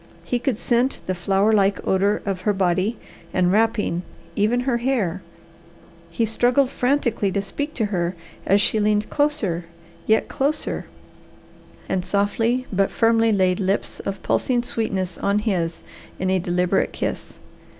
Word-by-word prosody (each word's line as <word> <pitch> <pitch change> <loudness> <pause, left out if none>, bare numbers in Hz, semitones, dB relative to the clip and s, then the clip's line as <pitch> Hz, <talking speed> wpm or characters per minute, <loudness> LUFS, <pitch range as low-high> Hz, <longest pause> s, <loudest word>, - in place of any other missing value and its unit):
He 245 - -1
could 245 -3 -1
scent 245 +3 +1
the 185 - -1
flower 195 +4 +2
like 200 -2 +3
odour 200 +2 +2
of 195 -2 -2
her 210 - +1
body 190 +3 +1 0.4
and 180 -1 +3
wrapping, 210 -4 +1 0.3
even 220 +4 +2
her 250 -2 0
hair. 230 -8 -1 0.9
He 225 +7 0
struggled 245 +4 +2
frantically 245 -7 +1
to 200 - 0
speak 285 +9 -4
to 225 - 0
her 175 0 0 0.3
as 200 +2 +3
she 215 - +2
leaned 210 0 +1
closer, 265 - 0 0.4
yet 220 0 +3
closer, 295 +3 -2 1.0
and 185 -1 -1
softly 215 +6 0
but 195 0 +2
firmly 225 0 +3
laid 185 -3 +2
lips 195 0 -1
of 195 -1 -5
pulsing 245 -2 +1
sweetness 195 -6 -2
on 200 +1 +1
his 180 -6 -1 0.3
in 185 0 -1
a 190 - +2
deliberate 180 +1 0
kiss. - - -4
205 Hz, 145 wpm, -22 LUFS, 185-235 Hz, 1.0 s, like